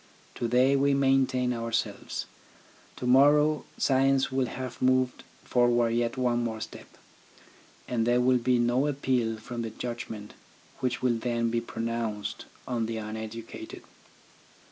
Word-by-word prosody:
To 120 - -2
day 130 +3 +4
we 140 0 +3
maintain 130 -2 +2
ourselves. 115 -1 -3 0.7
To - - -6
morrow 145 +4 +5
science 135 0 +2
will 130 -1 +1
have 130 -1 -6
moved 130 0 +2 0.2
forward 120 -1 +2
yet 120 +2 0
one 120 -2 +1
more 110 -2 -3
step, - - -8 1.0
and 115 -2 0
there 120 0 +4
will 125 0 +3
be 125 +1 +2
no 120 +4 +2
appeal 130 -5 0
from 120 +2 -6
the 115 - -3
judgment 110 -2 -6 0.5
which 125 -1 -2
will 120 -2 +2
then 115 -1 0
be 115 0 0
pronounced 115 -2 -4 0.2
on 120 -3 -1
the 115 0 -3
uneducated. 110 +1 -7
120 Hz, 135 wpm, -28 LUFS, 115-130 Hz, 1.0 s, morrow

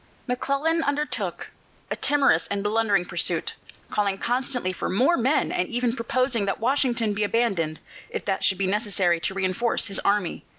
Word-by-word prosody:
McClellan 275 +6 0
undertook 295 0 -2 0.4
a - - +1
timorous 280 - +2
and 200 0 -2
blundering 205 -3 +2
pursuit, - - -1 0.4
calling 200 -2 0
constantly 245 -4 0
for - - -3
more 260 - +3
men 265 +3 +1
and 180 - 0
even 240 0 0
proposing 240 -2 0
that 195 - -1
Washington 240 -3 +1
be 210 +1 -1
abandoned, 200 -8 0 0.3
if - - -5
that 195 -1 -1
should 190 - +3
be 195 - 0
necessary 190 -4 +1
to 190 - -3
reinforce 195 +5 0
his 200 -3 -1
army. 200 -4 0
225 Hz, 160 wpm, -25 LUFS, 195-255 Hz, 0.4 s, more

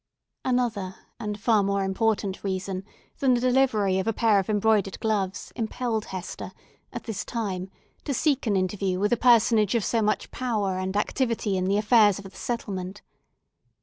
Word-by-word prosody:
Another 230 -7 -1 0.2
and 210 -2 -4
far 215 0 +3
more 200 0 0
important 195 0 -1
reason 190 -1 -3 0.4
than 260 -2 +4
the - - +1
delivery 245 -7 +2
of 190 - -2
a 225 - +2
pair 215 -2 +3
of 190 - -3
embroidered 210 -2 +2
gloves, 200 -3 -2
impelled 225 -1 -2
Hester, 185 -1 -7 0.4
at - - -6
this 220 -4 -4
time, 195 -5 -3 0.4
to 290 - -2
seek 280 -2 +1
an 205 - +2
interview 185 0 -1
with 205 +4 +2
a - - +5
personage 230 -3 +4
of 230 - +1
so 230 - +1
much 215 0 0
power 210 -7 -1
and 190 +1 -2
activity 230 -2 0
in 185 0 0
the 195 +2 +2
affairs 210 -2 +5
of 200 - -8
the 195 - -9
settlement. 195 -3 -5
210 Hz, 170 wpm, -26 LUFS, 195-230 Hz, 0.4 s, a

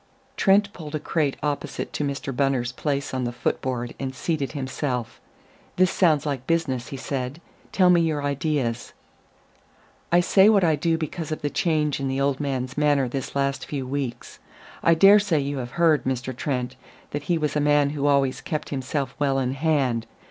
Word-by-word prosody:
Trent 200 -1 +3
pulled 155 -3 -7
a - - -1
crate 145 -2 -1
opposite 145 -1 -3
to - - -2
Mr. 140 -1 -3
Bunner's 130 -2 +1
place 140 +1 -2
on 130 -1 -1
the 120 - -1
foot 120 0 -2
board 120 -2 -3
and 130 -1 -4
seated 150 -1 -2
himself. 130 -4 -3 0.5
"This 185 -1 +3
sounds 155 -6 +3
like 135 -3 -3
business," 145 -7 0
he 135 - -6
said. 130 +2 -4 0.3
"Tell 180 -2 +5
me 175 -1 +5
your 155 -3 0
ideas." 140 -4 -1 1.2
"I 175 - +6
say 190 +3 +5
what 205 -3 +4
I 160 -3 +4
do 165 +2 +1
because 160 0 -5
of 155 - -4
the 145 - -1
change 150 -4 +1
in 135 - -2
the 135 0 -1
old 140 -1 +1
man's 130 -3 -2
manner 145 -3 +3
this 135 +2 -5
last 140 0 -1
few 140 -3 -3
weeks. 135 -2 -5 0.4
I 165 - +4
dare 195 +5 +7
say 195 -7 +1
you 140 0 -2
have 120 0 -6
heard, 160 -6 +3
Mr. 130 -1 -2
Trent, 130 -2 -2 0.4
that 145 0 -4
he 175 - +3
was 150 -2 -1
a - - +2
man 145 -1 +3
who 145 -1 -1
always 140 -2 +2
kept 155 -1 -4
himself 135 0 -3
well 140 -2 +1
in 130 -1 0
hand. 135 -6 0
140 Hz, 190 wpm, -24 LUFS, 130-155 Hz, 1.2 s, dare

